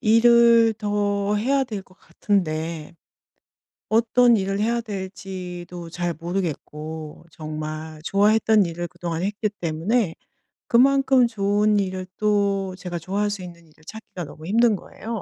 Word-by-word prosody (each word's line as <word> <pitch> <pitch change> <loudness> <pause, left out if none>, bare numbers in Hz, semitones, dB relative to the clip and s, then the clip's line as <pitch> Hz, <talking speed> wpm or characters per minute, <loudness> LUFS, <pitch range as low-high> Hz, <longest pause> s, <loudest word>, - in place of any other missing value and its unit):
일을 230 0 +5
더 205 -1 0
해야 270 +5 +1
될 210 -5 -6
것 185 - -23
같은데 165 -4 -2 1.0
어떤 235 +1 +4
일을 195 +1 -1
해야 235 +2 +1
될지도 185 -4 -7
잘 175 0 -2
모르겠고 160 -2 -5
정말 155 0 -6
좋아했던 210 +2 +3
일을 170 +1 -4
그동안 170 0 -4
했기 210 +2 -1
때문에 170 +4 0 0.5
그만큼 265 0 +4
좋은 210 -1 +1
일을 185 -1 -3
또 200 -3 +1
제가 180 -1 -5
좋아할 200 +5 -1
수 200 -2 -5
있는 170 -2 -11
일을 155 0 -24
찾기가 220 -4 -8
너무 155 +2 -10
힘든 225 +3 +3
거예요. 225 +3 -7
195 Hz, 270 characters per minute, -23 LUFS, 170-220 Hz, 1.0 s, 일을